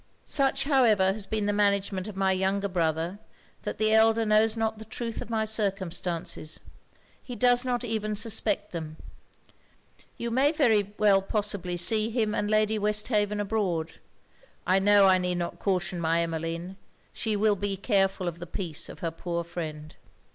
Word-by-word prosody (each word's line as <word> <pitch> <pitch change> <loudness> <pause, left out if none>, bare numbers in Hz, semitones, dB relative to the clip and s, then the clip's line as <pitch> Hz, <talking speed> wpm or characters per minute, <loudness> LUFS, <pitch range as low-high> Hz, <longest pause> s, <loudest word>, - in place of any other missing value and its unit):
Such, 275 -1 +2
however, 225 -9 +3
has 200 -1 -3
been 215 -2 -1
the 205 - +1
management 200 -1 +1
of 210 - -7
my 195 0 +2
younger 190 +2 0
brother, 170 +1 -1 0.4
that - - -5
the 215 0 +2
elder 225 +1 +4
knows 215 +1 +3
not 220 -1 -1
the 220 - -9
truth 230 +1 -5
of - - -8
my 220 -1 0
circumstances 190 -6 -2 0.6
he 250 - -8
does 245 +2 +4
not 250 -1 -1
even 215 -2 -2
suspect 210 -1 -1
them. 160 -2 -6 1.2
You 235 0 -4
may 275 +6 +3
very 240 -9 +3
possibly 200 -2 0
see 215 +5 +2
him 220 -2 0
and 205 - -1
Lady 215 0 +2
Westhaven 210 0 0
abroad. 195 -6 -2 0.7
I 185 +1 +3
know 205 0 +5
I 190 -1 +5
need 180 -1 -1
not 175 -1 -4
caution 185 -2 -1
my 165 +1 +2
Emmeline 165 +3 -4 0.4
she 220 -2 -2
will 210 0 +2
be 200 0 -3
careful 195 -3 +1
of 170 0 -4
the 175 - -7
peace 165 -4 -5
of - - -11
her 165 - -2
poor 170 +1 -4
friend.' 155 -3 -7
205 Hz, 160 wpm, -27 LUFS, 180-220 Hz, 1.2 s, know